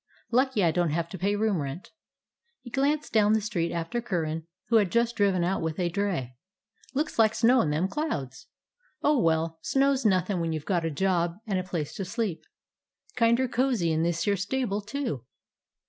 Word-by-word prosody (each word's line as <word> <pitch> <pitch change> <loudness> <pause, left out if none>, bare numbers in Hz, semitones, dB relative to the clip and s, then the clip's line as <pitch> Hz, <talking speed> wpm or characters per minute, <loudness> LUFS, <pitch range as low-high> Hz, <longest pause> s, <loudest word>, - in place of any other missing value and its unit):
Lucky 255 -3 +2
I 165 - +4
don't 175 0 +1
have 165 +2 -1
to 190 - -7
pay 200 +2 +1
room 205 -5 +1
rent." 140 +5 -6 0.7
He 240 - -10
glanced 290 +4 0
down 215 -1 +4
the 220 - +4
street 200 -6 -2
after 170 +9 -2
Curran, 165 -6 -2 0.2
who 230 - +5
had 200 -5 +2
just 235 0 +1
driven 195 -4 +2
out 185 +3 0
with 160 -1 -2
a 175 -1 +1
dray. 170 -10 -2 0.6
"Looks 295 -3 -1
like 220 -1 +4
snow 235 +3 +5
in 150 - 0
them 155 +5 +1
clouds. 175 - -4 0.6
Oh, 295 -2 +4
well, 160 -1 +1
snow 275 +8 +2
's 265 - -3
nothin' 190 -2 +2
when 165 -1 -1
you 155 - -1
've 150 - -17
got 175 -4 0
a - - 0
job 170 +1 0
and 195 -4 0
a - - -2
place 170 -5 -4
to 195 - -3
sleep. 210 -3 -3 0.7
Kinder 235 +2 +3
cozy 240 -8 +1
in 160 0 +1
this 170 0 0
here 200 +1 +2
stable, 205 +1 -1
too." 215 - -4
195 Hz, 195 wpm, -27 LUFS, 165-230 Hz, 0.7 s, who